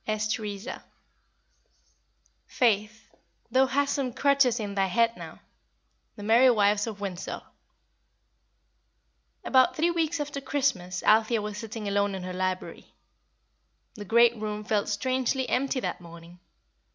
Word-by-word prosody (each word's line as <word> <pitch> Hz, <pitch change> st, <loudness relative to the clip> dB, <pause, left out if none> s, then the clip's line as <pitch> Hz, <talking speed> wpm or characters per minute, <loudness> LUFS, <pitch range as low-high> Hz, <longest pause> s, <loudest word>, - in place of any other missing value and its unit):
S. 215 Hz, 0 st, -1 dB
TERESA. 210 Hz, +2 st, -6 dB, 1.7 s
"Faith, 215 Hz, -2 st, 0 dB, 0.4 s
thou 260 Hz, +2 st, +4 dB
hast 280 Hz, +1 st, 0 dB
some 270 Hz, -3 st, -2 dB
crotchets 280 Hz, -3 st, +3 dB
in 205 Hz, -2 st, -4 dB
thy 195 Hz, -1 st, +1 dB
head 230 Hz, +5 st, +2 dB
now." -, -, -10 dB, 0.8 s
The 205 Hz, -, -9 dB
Merry 235 Hz, +5 st, +5 dB
Wives 205 Hz, -2 st, +2 dB
of 215 Hz, -3 st, -6 dB
Windsor. 190 Hz, -3 st, -5 dB, 2.0 s
About 260 Hz, -1 st, +3 dB
three 335 Hz, +3 st, +2 dB
weeks 330 Hz, -1 st, -1 dB
after 285 Hz, -1 st, -4 dB
Christmas 220 Hz, -11 st, -1 dB
Althea 220 Hz, +1 st, +3 dB
was 210 Hz, 0 st, -5 dB
sitting 225 Hz, -2 st, -6 dB
alone 200 Hz, 0 st, 0 dB
in 190 Hz, -, -6 dB
her 185 Hz, 0 st, -5 dB
library. 185 Hz, 0 st, -4 dB, 1.0 s
The 210 Hz, -, -8 dB
great 235 Hz, +3 st, +4 dB
room 210 Hz, -1 st, -5 dB
felt 210 Hz, -1 st, -1 dB
strangely 255 Hz, +4 st, -1 dB
empty 270 Hz, 0 st, 0 dB
that -, -, -4 dB
morning. 170 Hz, +1 st, -13 dB
220 Hz, 125 wpm, -27 LUFS, 205-260 Hz, 2.0 s, Merry